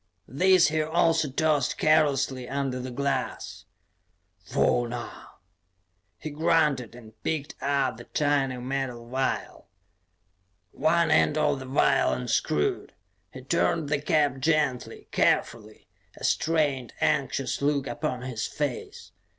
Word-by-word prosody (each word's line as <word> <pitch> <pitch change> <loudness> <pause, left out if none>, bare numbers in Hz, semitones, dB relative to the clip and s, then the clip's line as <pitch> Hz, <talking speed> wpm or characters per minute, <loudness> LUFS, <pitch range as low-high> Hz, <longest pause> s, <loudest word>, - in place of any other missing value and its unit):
These 180 +3 +4
he 155 0 0
also 160 -1 +2
tossed 150 -1 +1
carelessly 140 -4 +2
under 135 -2 -2
the 130 +1 -5
glass. 140 +3 -3 0.8
"Fauna," 120 +7 0 1.1
he 155 - -7
grunted, 150 -6 +1
and 110 -2 -15
picked 150 -3 -3
up 140 -4 0
the 120 - -11
tiny 140 -3 0
metal 125 -2 -4
vial. 130 +2 -3 1.0
One 165 +2 +2
end 150 - +3
of 140 - +1
the 130 - -8
vial 130 - +2
unscrewed. 65 +3 -1 0.4
He - - -10
turned 90 - 0
the 145 -1 0
cap 145 -3 +1
gently, 150 -3 -1
carefully, 110 -2 0 0.3
a - - -12
strained, 145 -7 0
anxious - - 0
look 140 -1 +1
upon 125 0 -3
his 125 -4 -3
face. 145 -4 -5
140 Hz, 115 wpm, -26 LUFS, 125-150 Hz, 1.1 s, These